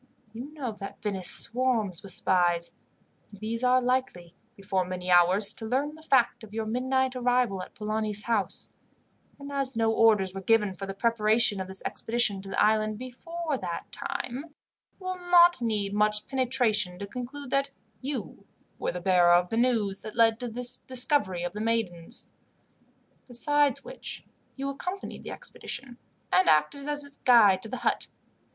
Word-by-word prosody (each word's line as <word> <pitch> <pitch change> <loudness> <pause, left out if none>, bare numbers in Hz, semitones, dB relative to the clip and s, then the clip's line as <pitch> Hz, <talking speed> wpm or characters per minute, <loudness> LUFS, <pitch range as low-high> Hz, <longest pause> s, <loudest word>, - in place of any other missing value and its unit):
You 250 +6 -8
know 270 -6 -4
that 195 - -8
Venice 195 -4 0
swarms 230 -8 +2
with 195 - -8
spies, 175 -2 +1 0.6
and 205 - -14
these 230 +3 -3
are 250 0 +4
likely, 245 -9 -2 0.2
before 195 -2 -1
many 180 0 -4
hours, 185 +4 +6
to 225 - -8
learn 275 +5 -1
the 315 - -14
fact 265 -7 +2
of 215 -1 -11
your 225 -1 -2
midnight 260 +3 0
arrival 245 -5 +1
at 180 - -11
Polani's 215 -1 -3
house; 225 -4 -2 0.6
and 280 0 -9
as 275 -3 -2
no 225 -1 +2
orders 210 -5 +3
were 195 - -6
given 210 -1 +2
for 195 +1 -7
the 195 - -6
preparation 220 -2 +2
of 185 - -6
this 190 0 0
expedition 225 -4 0
to 195 - -9
the - - -3
island 215 0 +2
before 290 +5 -5
that 175 -3 -6
time, 260 +5 -4
it 325 - -20 0.5
will 370 -1 -5
not 350 -3 +5
need 210 -4 -1
much 210 0 +2
penetration 235 -8 +1
to 200 - -6
conclude 250 +5 -8
that 275 0 +1 0.3
you 275 0 -6 0.3
were - - -2
the 180 - -5
bearer 175 -1 +4
of 180 0 +2
the - - -2
news 225 -5 +1
that 215 - -9
led 225 -1 +3
to 245 - -4
the 240 +2 -1 0.2
discovery 250 - +1
of 175 0 -4
the 210 - -5
maidens. 220 -7 -2 0.9
Besides 285 +2 +1
which, - - -8 0.3
you 275 0 -4
accompanied 360 +8 -6
the - - -8
expedition, 245 -3 -7 0.3
and 370 - +4
acted 155 - +1
as 295 0 -3
its 280 0 -13
guide 210 -7 +5
to 220 - -9
the 255 - -4
hut. 240 - -1
225 Hz, 170 wpm, -27 LUFS, 195-260 Hz, 0.9 s, hours